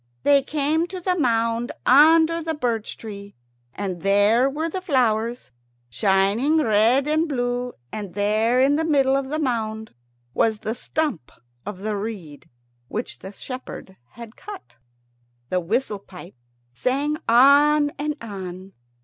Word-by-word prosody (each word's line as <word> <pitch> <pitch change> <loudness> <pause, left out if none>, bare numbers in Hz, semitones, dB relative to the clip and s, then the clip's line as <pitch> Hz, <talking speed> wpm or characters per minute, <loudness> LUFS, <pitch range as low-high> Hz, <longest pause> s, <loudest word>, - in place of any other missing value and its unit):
They 280 -1 +5
came 305 +4 0
to 370 +1 -7
the 360 +1 0
mound 230 -5 0
under 320 +4 +5
the 320 0 -3
birch 235 -6 -2
tree, 200 -2 -9 0.4
and 185 +1 -5
there 205 +6 +3
were 310 +4 -3
the 370 +3 -4
flowers, 240 - 0 0.4
shining 200 - +2
red 240 +1 +3
and 310 +2 +1
blue, 245 -2 -2 0.2
and 205 -4 -7
there 215 +4 +2
in 275 +3 +3
the 320 - 0
middle 275 -4 +2
of 275 -1 -2
the 305 - -2
mound 220 -6 -3 0.4
was 220 - +1
the 215 +1 -4
Stump 260 - -3 0.4
of 200 -2 -6
the 215 0 -2
reed 200 -8 -7 0.4
which 225 - -5
the 190 - -9
shepherd 255 -4 -9 0.2
had 235 -1 -11
cut. 390 - -11 0.7
The 185 - +1
whistle 210 +4 -2
pipe 180 -2 -13 0.4
sang 280 - -1
on 290 +4 +5
and 300 0 -2
on. 190 -3 -8
240 Hz, 140 wpm, -23 LUFS, 210-290 Hz, 0.7 s, They